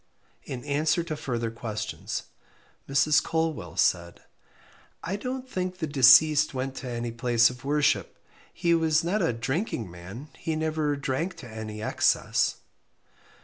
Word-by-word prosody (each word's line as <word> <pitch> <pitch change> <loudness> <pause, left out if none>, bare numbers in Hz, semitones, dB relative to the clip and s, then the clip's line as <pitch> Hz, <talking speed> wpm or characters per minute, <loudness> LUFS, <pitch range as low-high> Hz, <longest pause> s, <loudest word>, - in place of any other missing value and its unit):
In 125 -1 -6
answer 150 +3 +1
to 160 -2 -4
further 120 -5 -3
questions, 110 -1 -5 0.7
Mrs. 145 +2 +4
Colwell 160 -1 -2
said 85 -1 +1 0.8
I 185 +4 -2
don't 255 +4 -5
think 185 -5 -3
the 170 - -2
deceased 145 +1 +6
went 130 +1 -2
to 130 - -6
any 120 -1 -3
place 120 0 +3
of 125 0 -12
worship. 145 +1 +1 0.3
He 170 -1 +1
was 160 -1 +2
not 190 +5 0
a 165 - +2
drinking 120 - -3
man 95 - -10
he 160 - -3
never 155 -2 0
drank 140 +6 -2
to 125 - -10
any 110 -1 -7
excess. - - +1
145 Hz, 140 wpm, -27 LUFS, 120-160 Hz, 0.8 s, deceased